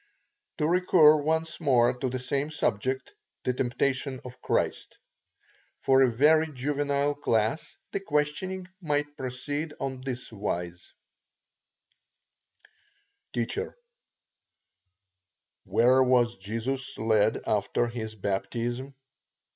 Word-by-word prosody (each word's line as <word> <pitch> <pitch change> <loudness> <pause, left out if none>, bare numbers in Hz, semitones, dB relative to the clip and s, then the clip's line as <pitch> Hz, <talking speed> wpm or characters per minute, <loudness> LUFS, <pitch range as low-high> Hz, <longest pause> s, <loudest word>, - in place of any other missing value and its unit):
To 150 - +1
recur 170 -3 +6
once 160 +2 -1
more 125 -6 +4
to 130 - -1
the 130 - -2
same 135 +3 -2
subject, 130 - -1 0.3
the 125 - +1
temptation 130 +2 -1
of 125 0 -10
Christ. - - -1 0.8
For 135 0 +4
a 130 -2 +5
very 155 +6 +4
juvenile 145 +1 0
class, 145 +2 -1
the - - -1
questioning 180 +3 -1
might 145 -2 -1
proceed 145 +4 -4
on 130 -1 -4
this 125 -2 -5
wise: 90 -4 -4 2.4
T. - - 0 2.2
Where 130 +2 +4
was 125 -2 +3
Jesus 115 +7 -4
led 110 -1 +2
after 105 +3 +1
his 110 -2 -5
baptism? 115 +7 -3
130 Hz, 100 wpm, -28 LUFS, 120-150 Hz, 2.4 s, recur